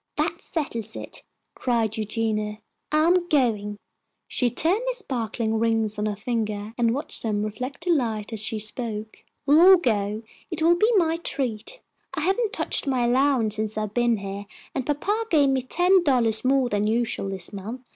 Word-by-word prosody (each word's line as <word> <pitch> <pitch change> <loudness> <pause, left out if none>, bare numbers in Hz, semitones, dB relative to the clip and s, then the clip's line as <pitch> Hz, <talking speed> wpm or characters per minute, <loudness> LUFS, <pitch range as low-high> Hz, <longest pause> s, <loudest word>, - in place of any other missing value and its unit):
"That - - -1
settles 230 - -4
it!" - - -6 0.3
cried 230 -3 0
Eugenia, 215 -1 -2 0.3
"I 305 +1 +3
am 350 +1 +3
going." 215 -8 +1 0.5
She 245 - +1
turned 335 - +2
the - - 0
sparkling 230 - -2
rings 225 -2 0
on 210 - 0
her 210 - -2
finger 215 -1 -3
and 235 -1 +1
watched 285 - -4
them 210 -2 -1
reflect 250 - -5
the 360 - +2
light 225 -7 -1
as 220 - 0
she 220 +1 0
spoke. 215 0 -4 0.2
"We'll 295 +3 +6
all 375 +1 +9
go. 215 - -1 0.3
It 325 -2 -3
will 335 +1 +6
be 430 +7 +3
my 330 -2 +2
treat. 265 - -3 0.3
I - - -2
haven't 390 +6 +1
touched - - 0
my 255 -3 +1
allowance 245 -4 +2
since 215 0 -3
I've 215 -1 -3
been 240 -1 +2
here, 200 0 -6 0.3
and 260 - -3
papa 410 +10 -1
gave 290 -4 +4
me 265 -1 +1
ten 360 +8 +3
dollars 235 -7 +3
more 265 0 +3
than 210 -2 0
usual 225 -3 -1
this 190 0 -3
month. 215 +6 -6
235 Hz, 175 wpm, -24 LUFS, 215-295 Hz, 0.5 s, all